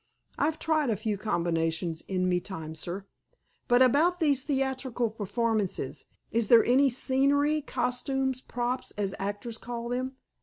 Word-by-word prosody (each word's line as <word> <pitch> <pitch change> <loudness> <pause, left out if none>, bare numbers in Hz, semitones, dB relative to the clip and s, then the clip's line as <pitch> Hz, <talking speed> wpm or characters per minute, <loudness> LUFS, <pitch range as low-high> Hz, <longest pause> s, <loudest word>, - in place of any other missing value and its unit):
"I've 310 +2 +1
tried 310 -4 +1
a 220 - +2
few 215 0 -1
combinations 165 -4 -1
in 185 -1 0
me 180 -1 +2
time, 160 -5 -7
sir." 175 +5 -5 0.6
"But, 245 +1 +6
about 320 +8 +3
these 285 -5 +2
theatrical 265 -4 -1
performances—is 220 - -2
there 230 0 +7
any 270 +3 +5
scenery, 280 +4 +2
costumes, 265 -1 -1
'props' 245 +1 -3
as 200 -2 -1
actors 205 +4 -4
call 235 0 -5
them?" 255 +2 -2
240 Hz, 130 wpm, -28 LUFS, 200-270 Hz, 0.6 s, there